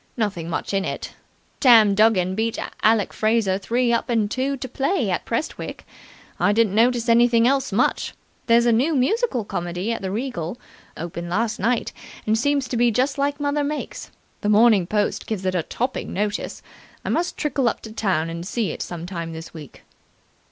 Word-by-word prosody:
Nothing 195 Hz, -7 st, -2 dB
much 170 Hz, -, -3 dB
in 195 Hz, -1 st, +1 dB
it. -, -, -5 dB, 0.5 s
Tam 225 Hz, -6 st, +7 dB
Duggan 195 Hz, -3 st, +3 dB
beat 225 Hz, +3 st, -1 dB, 0.2 s
Alec 215 Hz, -2 st, +3 dB
Fraser 215 Hz, -3 st, +1 dB
three 235 Hz, +4 st, +1 dB
up 235 Hz, -, 0 dB
and 220 Hz, -3 st, +1 dB
two 270 Hz, +2 st, -1 dB
to 260 Hz, -, -5 dB
play 265 Hz, -, 0 dB
at 175 Hz, -, -2 dB
Prestwick. 230 Hz, +7 st, -4 dB, 0.5 s
I 205 Hz, -, +3 dB
didn't 220 Hz, -2 st, +2 dB
notice 235 Hz, +2 st, +3 dB
anything 235 Hz, 0 st, +5 dB
else 270 Hz, -2 st, +1 dB
much. 220 Hz, +6 st, 0 dB, 0.3 s
There's 235 Hz, 0 st, +5 dB
a 240 Hz, -, +4 dB
new 270 Hz, +8 st, +2 dB
musical 270 Hz, -, +1 dB
comedy 175 Hz, +4 st, -3 dB
at -, -, -5 dB
the 190 Hz, -, -3 dB
Regal. 220 Hz, -3 st, -4 dB, 0.4 s
Opened 170 Hz, +1 st, -5 dB
last 220 Hz, +4 st, -1 dB
night, 235 Hz, +4 st, 0 dB, 0.3 s
and 215 Hz, -, +2 dB
seems 280 Hz, +3 st, +1 dB
to 245 Hz, -, -2 dB
be 240 Hz, +1 st, +4 dB
just 260 Hz, +5 st, 0 dB
like 285 Hz, +1 st, 0 dB
mother 290 Hz, 0 st, 0 dB
makes. 295 Hz, +1 st, -4 dB, 0.3 s
The 210 Hz, -, 0 dB
Morning 210 Hz, -4 st, +5 dB
Post 210 Hz, +1 st, -1 dB
gave 200 Hz, -4 st, -3 dB
it 185 Hz, -, +1 dB
a 180 Hz, -, +1 dB
topping 250 Hz, +10 st, -3 dB
notice. 205 Hz, +1 st, -3 dB, 0.4 s
I -, -, -2 dB
must 345 Hz, +1 st, -1 dB
trickle 275 Hz, -4 st, +1 dB
up -, -, -5 dB
to 220 Hz, -, -9 dB
town 190 Hz, -7 st, 0 dB
and 165 Hz, +1 st, -5 dB
see 205 Hz, -1 st, -2 dB
it -, -, -7 dB
some 170 Hz, -1 st, -5 dB
time 170 Hz, -3 st, -5 dB
this 160 Hz, 0 st, -9 dB
week." 150 Hz, -5 st, -11 dB
225 Hz, 185 wpm, -23 LUFS, 190-250 Hz, 0.5 s, Tam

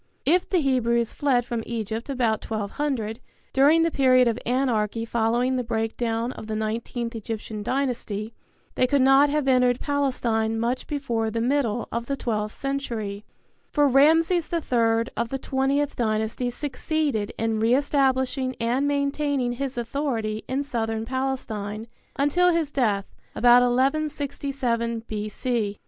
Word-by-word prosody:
If 350 Hz, +5 st, +2 dB
the 375 Hz, -, +2 dB
Hebrews 235 Hz, -4 st, +1 dB
fled 260 Hz, -5 st, +1 dB
from 235 Hz, -2 st, -3 dB
Egypt 225 Hz, +1 st, -4 dB
about 240 Hz, -5 st, 0 dB
1200, 220 Hz, +1 st, -3 dB, 0.3 s
during 295 Hz, +5 st, +5 dB
the 330 Hz, -, +1 dB
period 255 Hz, -3 st, +4 dB
of 230 Hz, 0 st, 0 dB
anarchy 230 Hz, -3 st, 0 dB
following 235 Hz, +3 st, +1 dB
the 250 Hz, -, -1 dB
breakdown 225 Hz, +1 st, -2 dB
of 220 Hz, -, -9 dB
the 220 Hz, -, -3 dB
nineteenth 230 Hz, +2 st, -3 dB
Egyptian 220 Hz, -1 st, -5 dB
dynasty, 230 Hz, -3 st, -2 dB, 0.4 s
they 255 Hz, -, +2 dB
could 275 Hz, 0 st, +3 dB
not 270 Hz, +2 st, +6 dB
have 295 Hz, -1 st, 0 dB
entered 250 Hz, -1 st, +3 dB
Palestine 235 Hz, -6 st, 0 dB
much 240 Hz, +3 st, -1 dB
before 240 Hz, -7 st, -1 dB
the 230 Hz, +1 st, -2 dB
middle 240 Hz, -2 st, 0 dB
of 235 Hz, +1 st, -3 dB
the 275 Hz, -, -2 dB
twelfth 215 Hz, -4 st, -2 dB
century, 230 Hz, -7 st, -3 dB, 0.4 s
for 290 Hz, -2 st, +3 dB
Ramses 320 Hz, +5 st, +4 dB
III 230 Hz, -8 st, +2 dB
of 235 Hz, 0 st, -1 dB
the 270 Hz, -, -2 dB
Twentieth 275 Hz, +2 st, 0 dB
Dynasty 220 Hz, +2 st, -1 dB
succeeded 280 Hz, -3 st, -2 dB
in 225 Hz, -1 st, 0 dB
re 230 Hz, +3 st, +3 dB
establishing 265 Hz, -2 st, +1 dB
and 245 Hz, +5 st, +1 dB
maintaining 280 Hz, -2 st, 0 dB
his 265 Hz, +1 st, -4 dB
authority 230 Hz, -3 st, -2 dB
in 270 Hz, +2 st, -1 dB
Southern 225 Hz, -5 st, -2 dB
Palestine 225 Hz, -5 st, -3 dB, 0.3 s
until 320 Hz, +6 st, +3 dB
his 330 Hz, -4 st, 0 dB
death 210 Hz, -8 st, +1 dB, 0.3 s
about 245 Hz, +1 st, +6 dB
1167 265 Hz, -3 st, 0 dB
B.C. 215 Hz, 0 st, -2 dB
245 Hz, 135 wpm, -25 LUFS, 225-275 Hz, 0.4 s, not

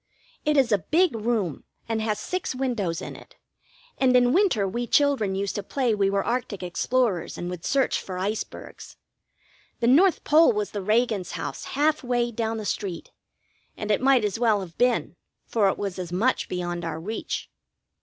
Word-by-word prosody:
It 300 Hz, 0 st, +2 dB
is 260 Hz, -4 st, +3 dB
a 205 Hz, -, +4 dB
big 320 Hz, -, +2 dB
room, 215 Hz, -, -1 dB, 0.2 s
and 225 Hz, -1 st, -1 dB
has 215 Hz, -1 st, -1 dB
six 365 Hz, -3 st, -3 dB
windows 235 Hz, -11 st, -2 dB
in -, -, -7 dB
it, -, -, -15 dB, 0.6 s
and 255 Hz, -1 st, +5 dB
in 245 Hz, 0 st, +4 dB
winter 345 Hz, -, +3 dB
we 235 Hz, +5 st, -3 dB
children 265 Hz, -8 st, +2 dB
used 195 Hz, +1 st, -2 dB
to 205 Hz, -, -3 dB
play 245 Hz, +3 st, 0 dB
we 200 Hz, -2 st, +2 dB
were 195 Hz, 0 st, 0 dB
arctic 235 Hz, -5 st, -2 dB
explorers 195 Hz, +1 st, 0 dB
and 175 Hz, +1 st, -4 dB
would 175 Hz, -2 st, -7 dB
search 270 Hz, -2 st, +1 dB
for 185 Hz, -1 st, -6 dB
icebergs. 205 Hz, +4 st, -5 dB, 0.8 s
The -, -, 0 dB
North 325 Hz, +10 st, +4 dB
Pole 315 Hz, -3 st, +5 dB
was 210 Hz, -1 st, -2 dB
the 205 Hz, -, -4 dB
Reagan's 215 Hz, -2 st, +1 dB
house, -, -, -5 dB
half 305 Hz, +1 st, +2 dB
way 240 Hz, -1 st, 0 dB
down 225 Hz, 0 st, -2 dB
the 215 Hz, -, -5 dB
street, 185 Hz, -5 st, -4 dB, 0.7 s
and 210 Hz, 0 st, -2 dB
it 210 Hz, -, +2 dB
might 260 Hz, -4 st, +4 dB
as 205 Hz, +1 st, -2 dB
well 220 Hz, -4 st, +3 dB
have 170 Hz, -3 st, -9 dB
been, 245 Hz, -1 st, +1 dB, 0.3 s
for 210 Hz, -4 st, +2 dB
it -, -, -2 dB
was 195 Hz, -2 st, -4 dB
as 175 Hz, -2 st, -5 dB
much 225 Hz, +9 st, +1 dB
beyond 175 Hz, -1 st, -3 dB
our 160 Hz, -1 st, -4 dB
reach. 215 Hz, +7 st, -5 dB
220 Hz, 185 wpm, -25 LUFS, 195-250 Hz, 0.8 s, and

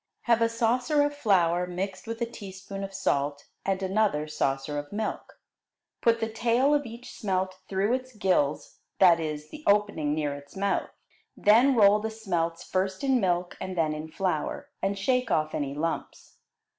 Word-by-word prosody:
Have 235 Hz, -1 st, +2 dB
a 230 Hz, -, +4 dB
saucer 245 Hz, +6 st, +2 dB
of 290 Hz, 0 st, -1 dB
flour 180 Hz, -8 st, +2 dB
mixed 185 Hz, +3 st, -4 dB
with 230 Hz, 0 st, -4 dB
a -, -, +1 dB
teaspoonful 195 Hz, -3 st, -8 dB
of 195 Hz, -, -5 dB
salt, 145 Hz, -6 st, -1 dB, 0.2 s
and 195 Hz, 0 st, -1 dB
another 190 Hz, -6 st, +1 dB
saucer 145 Hz, -1 st, -1 dB
of 145 Hz, 0 st, -8 dB
milk. 215 Hz, +1 st, -4 dB, 0.6 s
Put 230 Hz, 0 st, +3 dB
the 225 Hz, -, 0 dB
tail 235 Hz, +5 st, +2 dB
of 290 Hz, -3 st, +1 dB
each 235 Hz, +2 st, -10 dB
smelt 185 Hz, -2 st, -2 dB
through 195 Hz, +4 st, +1 dB
its 255 Hz, -1 st, -3 dB
gills 180 Hz, -8 st, 0 dB, 0.2 s
that 175 Hz, -3 st, +6 dB
is, 150 Hz, -1 st, -4 dB
the 305 Hz, -, -10 dB
opening 200 Hz, -8 st, +2 dB
near 150 Hz, -2 st, -1 dB
its 140 Hz, 0 st, -11 dB
mouth. 200 Hz, +1 st, 0 dB, 0.5 s
Then 240 Hz, +6 st, +5 dB
roll 210 Hz, -2 st, +6 dB
the 220 Hz, +1 st, -3 dB
smelts 175 Hz, -7 st, -2 dB
first 190 Hz, +4 st, -2 dB
in 265 Hz, -2 st, +3 dB
milk 175 Hz, -1 st, 0 dB
and 185 Hz, -1 st, -5 dB
then 155 Hz, -2 st, +2 dB
in 155 Hz, +1 st, -6 dB
flour, 285 Hz, -, -2 dB
and 195 Hz, +1 st, 0 dB
shake 250 Hz, +4 st, +1 dB
off 155 Hz, -4 st, +1 dB
any 140 Hz, -1 st, -2 dB
lumps. 165 Hz, +2 st, -4 dB
195 Hz, 170 wpm, -27 LUFS, 165-230 Hz, 0.6 s, that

